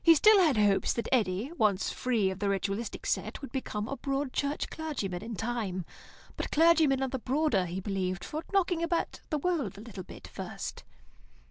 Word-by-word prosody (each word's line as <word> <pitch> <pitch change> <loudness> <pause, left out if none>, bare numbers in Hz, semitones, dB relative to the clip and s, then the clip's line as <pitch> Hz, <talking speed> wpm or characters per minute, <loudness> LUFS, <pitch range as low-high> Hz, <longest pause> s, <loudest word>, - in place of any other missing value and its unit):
He 330 -1 +8
still 425 +7 +7
had 300 -8 +3
hopes 205 -2 +3
that 235 - -2
Eddy, 220 - +1
once 200 -3 +2
free 225 -7 +1
of 190 - -6
the 205 - 0
ritualistic 200 +3 -2
set, - - -1
would 275 - -8
become 215 -5 -3
a 275 - -3
Broad 275 -1 -2
Church 285 +1 -1
clergyman 230 - -3
in 230 -1 -5
time. 210 -6 -2 0.5
But - - -3
clergymen 315 -4 +4
are 265 - 0
the 265 - -3
broader, 250 - +1
he 175 +2 -3
believed, 185 -2 -2
for 310 +2 -4
knocking 365 -4 +2
about 335 0 -1
the 305 - +1
world 285 - -1
a - - -8
little 210 -5 -8 0.2
first. - - -6
240 Hz, 185 wpm, -30 LUFS, 195-300 Hz, 0.5 s, He